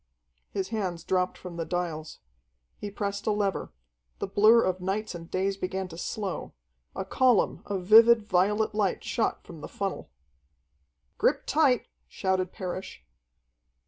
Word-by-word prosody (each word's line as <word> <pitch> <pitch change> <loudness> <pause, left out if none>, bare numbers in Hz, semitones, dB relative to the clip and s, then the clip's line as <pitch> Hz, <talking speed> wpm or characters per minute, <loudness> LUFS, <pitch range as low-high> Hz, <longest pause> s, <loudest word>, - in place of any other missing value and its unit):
His 190 -1 -3
hands 185 -7 -3
dropped 185 0 0
from 180 -2 -9
the 165 - -1
dials. 165 -3 -4 0.6
He 205 - -5
pressed 200 0 -4
a - - +4
lever. 205 -2 -1 0.5
The - - -2
blur 215 +4 +5
of 185 0 -1
nights 200 +3 -2
and 165 -1 -9
days 195 +1 -1
began 190 0 -3
to 165 - -10
slow. 200 0 -4 0.4
A 190 - -3
column 250 +2 +2
of 195 -3 -3
vivid 225 +2 +7
violet 210 +3 +1
light 205 -3 0
shot - - -1
from - - -11
the - - -6
funnel. - - -4 1.1
"Grip - - +2
tight!" - - +2 0.2
shouted 185 - -1
Parrish. 185 -1 -6
190 Hz, 145 wpm, -28 LUFS, 180-210 Hz, 1.1 s, vivid